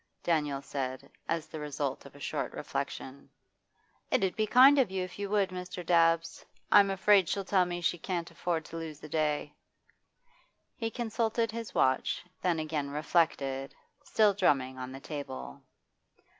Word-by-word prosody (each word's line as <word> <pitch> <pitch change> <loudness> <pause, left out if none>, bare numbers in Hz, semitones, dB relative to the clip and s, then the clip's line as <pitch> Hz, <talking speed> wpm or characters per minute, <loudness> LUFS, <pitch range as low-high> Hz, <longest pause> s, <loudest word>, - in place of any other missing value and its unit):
Daniel 150 -5 0
said, 130 -1 -4 0.2
as 165 -2 -1
the 155 - -7
result 145 -2 -3
of - - -17
a - - -13
short - - -3
reflection. 135 +1 -5 0.8
'It - - +2
'ud 190 - 0
be 215 0 0
kind 265 +5 +7
of 255 - +3
you 190 -1 -2
if 180 +2 -8
you 200 -1 -3
would, 200 -2 +2
Mr. 180 -1 -6
Dabbs. 165 -1 +3 0.3
I'm 200 -1 +7
afraid 195 -1 +4
she'll 200 -1 -1
tell 185 -2 +3
me 175 0 -4
she 175 +1 0
can't 170 -1 -3
afford 165 -3 -2
to 165 - -8
lose 160 -3 -6
the 155 - -10
day.' 150 -1 0 1.2
He 225 -2 -2
consulted 230 -1 -1
his 230 0 -6
watch, 130 0 +2 0.2
then 175 -2 +1
again 155 -2 -2
reflected, 140 -3 0 0.3
still 210 -2 +3
drumming 135 -9 +1
on 130 0 -5
the 135 - -8
table. 65 - -7
165 Hz, 160 wpm, -30 LUFS, 145-195 Hz, 1.2 s, kind